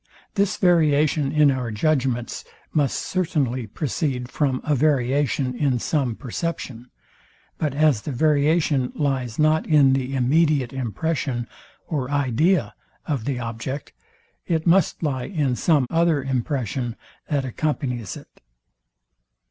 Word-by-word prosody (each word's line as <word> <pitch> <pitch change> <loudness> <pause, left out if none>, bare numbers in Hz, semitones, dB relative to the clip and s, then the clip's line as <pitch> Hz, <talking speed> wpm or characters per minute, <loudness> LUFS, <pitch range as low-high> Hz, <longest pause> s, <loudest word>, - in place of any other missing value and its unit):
This 200 -1 +1
variation 155 -4 +3
in 150 -2 +5
our 130 -3 -2
judgments 125 0 -1 0.3
must 145 -4 +1
certainly 140 -10 -1
proceed 125 0 -3
from 135 -4 0
a 150 - +1
variation 135 -2 +1
in 135 -1 +1
some 130 -2 -1
perception; 125 -3 -5 0.7
but 150 -4 -1
as 150 -7 +3
the 145 - -5
variation 145 -1 +2
lies 130 -6 -1
not 155 +1 +2
in 145 -4 +5
the 135 0 -1
immediate 135 0 +2
impression 130 0 -2 0.4
or 135 -6 -3
idea 145 +5 +1 0.3
of 135 -8 -2
the 140 -3 -1
object, 120 +4 -5 0.5
it 160 -2 0
must 175 -1 +3
lie 130 -5 -1
in 145 -9 -1
some 145 -1 +2
other 165 -4 +2
impression, 130 -2 -2 0.3
that 140 -3 0
accompanies 125 - -3
it. - - -16
140 Hz, 120 wpm, -23 LUFS, 125-155 Hz, 0.7 s, in